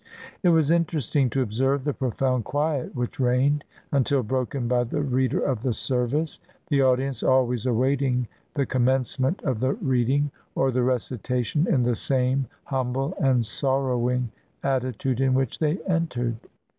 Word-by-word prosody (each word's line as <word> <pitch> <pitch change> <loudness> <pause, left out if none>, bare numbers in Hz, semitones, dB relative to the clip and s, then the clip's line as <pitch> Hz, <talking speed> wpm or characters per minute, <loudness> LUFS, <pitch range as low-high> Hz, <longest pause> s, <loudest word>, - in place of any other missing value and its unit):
It 180 - +4
was 160 -2 +4
interesting 155 -5 +1
to 135 +2 +1
observe 130 +5 0
the 145 0 0
profound 130 -1 0
quiet 145 +4 -1
which 125 +1 -3
reigned, 135 +4 +2 0.3
until 140 -1 +2
broken 130 +1 -2
by 125 0 +2
the 120 +5 -3
reader 130 -1 +1
of 130 -6 -1
the 125 -2 0
service; 130 +7 -1 0.3
the 140 -3 +3
audience 130 -1 +1
always 125 -2 +2
awaiting 130 0 +1 0.3
the 140 -2 +1
commencement 130 - 0
of 130 -6 -1
the 130 +3 +1
reading 140 - +1 0.2
or 135 0 +2
the 125 0 +1
recitation 125 - 0
in 130 -7 +3
the 120 0 +1
same 130 +2 +1 0.2
humble 135 +3 -2
and 130 -4 +3
sorrowing 125 -1 0 0.3
atti 130 -4 0
tude 130 -1 -1
in 130 -1 +3
which 130 -3 -1
they 155 +2 +1
entered. 130 - -1
130 Hz, 150 wpm, -25 LUFS, 125-140 Hz, 0.3 s, It